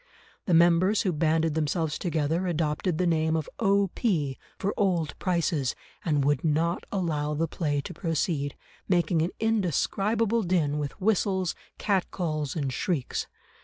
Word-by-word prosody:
The 180 - +4
members 175 +5 +4
who 185 - +1
banded 160 +1 +2
themselves 155 0 -1
together 165 +1 0
adopted 160 0 0
the 180 - +1
name 160 -1 +2
of 160 -2 -1
O.P., 195 - +1 0.2
for 200 - -1
Old 175 -6 +1
Prices, 170 -7 0 0.3
and 145 -4 +1
would 145 +5 +2
not 165 +2 +1
allow 150 -6 -1
the 165 +2 0
play 145 -3 -1
to - - -7
proceed, 155 -4 -1 0.3
making 175 -2 +2
an 165 - +1
indescribable 220 - +1
din 165 -6 +1
with 145 +4 -4
whistles, 190 -3 +1 0.2
cat 195 -3 0
calls, 155 -6 -2
and 140 -5 -2
shrieks. 150 -5 -2
165 Hz, 140 wpm, -27 LUFS, 150-185 Hz, 0.3 s, The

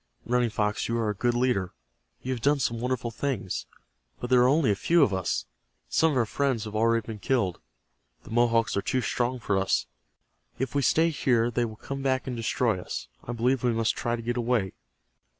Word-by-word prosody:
Running 125 0 +2
Fox, 105 -1 -1
you 115 - -1
are 110 -2 0
a - - -3
good 120 +4 0
leader. 120 -8 +1 0.5
You 130 - -1
have 120 - -5
done 145 +4 +3
some 120 -3 -1
wonderful 125 -1 -2
things. 115 -7 -3 0.5
But 120 - -5
there 125 -1 +6
are 125 - +5
only 140 -3 +3
a - - +2
few 170 - +3
of 105 - +2
us. 85 -10 -1 0.4
Some 160 -1 +3
of - - 0
our 120 - +3
friends 130 -1 0
have 105 -1 -7
already 115 0 +2
been 110 -2 -7
killed. 100 -6 0 0.6
The - - -12
Mohawks 115 -1 +2
are 100 - +1
too 130 +4 0
strong 120 +4 -1
for 100 -4 0
us. 95 - +1 0.7
If 130 -1 -2
we 140 - +2
stay 165 +4 +3
here 120 -5 +2
they 120 +1 +1
will 110 -1 -7
come 135 +5 -6
back 130 -1 0
and 130 - -4
destroy 115 -3 0
us. - - -6 0.2
I 120 - -4
believe 125 +2 +1
we 120 -1 +2
must 115 0 +1
try 120 0 -1
to 115 - -7
get 120 +1 -2
away." 115 -5 0
120 Hz, 215 wpm, -27 LUFS, 110-130 Hz, 0.7 s, there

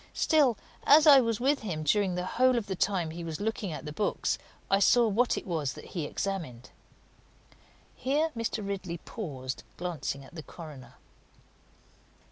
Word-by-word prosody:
Still, 290 -8 +3 0.3
as 300 +2 +8
I 285 -3 +9
was 230 -4 0
with 275 +3 +2
him 165 -8 -4
during 185 +4 +2
the 180 0 -2
whole 255 +5 +3
of 230 - -1
the 195 -1 -3
time 180 -4 0
he 170 +1 -7
was 160 -2 -5
looking 205 -3 -2
at 155 - -6
the 150 - -6
books, 205 +6 -1 0.3
I 195 - +3
saw 235 +4 +5
what 230 +4 +2
it - - -5
was 155 -7 -2
that - - -11
he 165 -5 -2
examined." 155 -10 -4 1.2
Here 300 +5 0
Mr. 225 -2 -3
Ridley 190 -3 -4
paused, 135 - -6 0.2
glancing 160 -6 -4
at - - -16
the 165 - -7
coroner. 150 -4 -11
195 Hz, 165 wpm, -29 LUFS, 160-230 Hz, 1.2 s, I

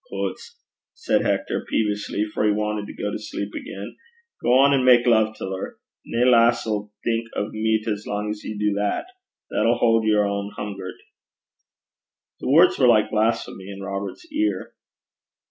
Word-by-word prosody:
'Hoots!' 475 - -5 0.4
said - - +1
Hector, - - -1
peevishly, 105 -1 -1
for - - 0
he 105 - +4
wanted 105 0 -2
to - - -8
go 105 - -1
to - - -4
sleep 105 -1 -5
again, 100 +4 -7 0.5
'gang 135 +3 +5
and 135 -2 +2
mak 125 -1 +6
luve 110 -2 +3
till 95 -2 -4
her. 95 - -6 0.3
Nae 120 +2 +1
lass 120 -1 +4
'll 105 -1 -3
think 115 0 -1
o' 105 - -2
meat 110 0 0
as 105 -1 -3
lang 105 +1 -2
's 105 - -12
ye 110 - -5
do 105 0 +1
that. 105 - -1 0.5
That - - +1
'll 115 +1 +4
haud 115 -1 +3
her 105 -1 +3
ohn 100 0 -3
hungert.' 95 -3 -6 1.4
The - - -4
words 165 +6 +5
were 130 - +5
like 110 -3 +4
blasphemy 110 -3 -1
in 100 0 -8
Robert's 100 - -5
ear. 320 +2 -1
105 Hz, 170 wpm, -23 LUFS, 105-115 Hz, 1.4 s, mak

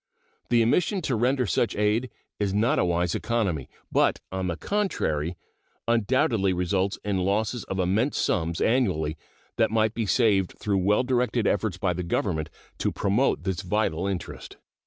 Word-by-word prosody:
The 120 -1 +4
omission 180 - +1
to 130 - 0
render 125 +3 +1
such 115 +1 0
aid 105 +4 +1 0.3
is 100 -1 0
not 110 +4 +2
a - - +3
wise 85 0 0
economy, 100 - -1 0.2
but, - - +2
on 95 -1 -2
the 85 -2 -2
contrary, 90 - -1 0.5
undoubtedly 115 -4 +2
results 95 +2 0
in 100 -2 0
losses 105 +4 0
of 95 - -4
immense 100 +9 +1
sums 85 +1 0
annually 95 - +1 0.4
that 115 -1 +3
might 110 0 +1
be 115 -2 -2
saved 100 -5 +2
through 100 -2 0
well 105 +6 +2
directed 125 -3 0
efforts 100 -2 0
by 90 -1 0
the 90 - -3
Government 85 -2 -1 0.3
to - - 0
promote 105 +7 +1
this 95 -2 -2
vital 95 -2 0
interest. 95 -3 -5
100 Hz, 155 wpm, -26 LUFS, 90-115 Hz, 0.5 s, The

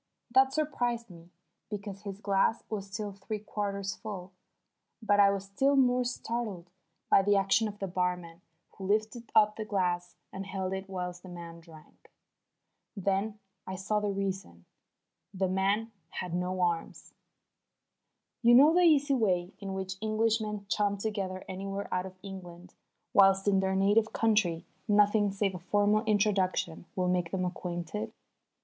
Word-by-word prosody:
That 265 +1 +6
surprised 245 -7 -1
me, 170 0 -14 0.4
because 200 -2 -6
his 200 -2 -6
glass 200 +2 +1
was 200 -2 -3
still 205 +1 -4
three 200 +2 -5
quarters 200 -2 -3
full. 190 -4 -7 0.7
But 205 -3 +2
I 200 -1 +7
was 195 -1 -2
still 270 +9 +2
more 250 -2 +4
startled 230 -7 -4 0.4
by - - +7
the 205 +1 +3
action 195 +3 +3
of 205 -1 -7
the 200 - -3
barman 180 -2 -2 0.3
who 195 - -7
lifted 215 +3 -1
up 210 0 +5
the 220 - -2
glass 180 -4 -1 0.2
and 195 0 -6
held 190 -1 -3
it 190 0 -5
whilst 180 -2 -4
the 185 - -11
man 170 -1 -9
drank. 165 -2 -17 0.9
Then 200 +2 0 0.3
I 190 - -4
saw 195 +3 0
the 210 0 -1
reason. 190 - -4 0.7
The 190 0 +1
man 200 +4 +1 0.2
had 180 -2 -5
no 180 +1 -1
arms. 170 -2 -2 1.3
You 240 0 +7
know 290 +5 +8
the 355 - +4
easy 295 -4 +5
way 185 -7 +1
in 195 -1 -5
which 190 0 -4
Englishmen 215 -1 0
chum 200 0 +1
together 195 -3 -3
anywhere 195 +1 -4
out 185 +1 -1
of 185 0 -13
England, 180 -3 -9 0.4
whilst 195 0 +5
in 195 -1 +4
their 190 0 0
native 205 +3 +3
country 210 -7 +2 0.2
nothing 205 0 +4
save 195 0 0
a 180 - -6
formal 205 +4 +2
introduction 195 -5 +1
will 185 -1 0
make 180 -2 +1
them 185 0 -1
acquainted? 175 - -4
195 Hz, 155 wpm, -30 LUFS, 185-215 Hz, 1.3 s, know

